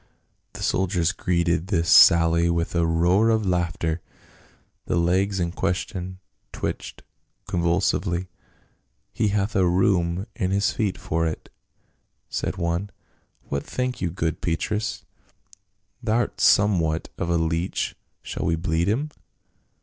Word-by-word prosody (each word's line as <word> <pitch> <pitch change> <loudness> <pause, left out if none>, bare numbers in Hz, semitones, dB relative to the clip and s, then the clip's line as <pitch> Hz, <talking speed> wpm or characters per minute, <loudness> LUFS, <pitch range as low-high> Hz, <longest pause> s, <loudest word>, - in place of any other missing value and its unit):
The - - -7
soldiers 90 -2 +1
greeted 85 -3 0
this 85 -4 0
sally 85 0 +6
with 85 0 -1
a 85 -1 +2
roar 90 +7 +3
of 110 -2 +2
laugh 85 -3 0
ter; 80 0 -2 0.9
the - - 0
legs 95 +3 +1
in 85 -1 -1
question 90 +1 -3 0.3
twitched - - -5 0.4
convulsively. 85 +1 0 0.5
" - - -42 0.3
He 110 - +1
hath 105 +1 0
a 95 -2 +3
rheum 90 -1 +1
in 95 -6 -1
his 100 +2 +1
feet 105 -6 -1
for 80 +1 -1
it," 80 - -6 0.8
said - - -3
one, 85 +3 -1 0.6
"what 70 - -2
think 125 0 -3
you 90 - 0
good 80 -2 -3
Petrus, 105 +6 -2 1.0
thou'rt 115 +2 0
somewhat 85 -6 +3
of 85 - -2
a 85 - +2
leech, 80 +2 -1 0.3
shall - - -4
we 80 - +2
bleed 80 +1 0
him?" 145 +8 -1
90 Hz, 130 wpm, -24 LUFS, 85-100 Hz, 1.0 s, sally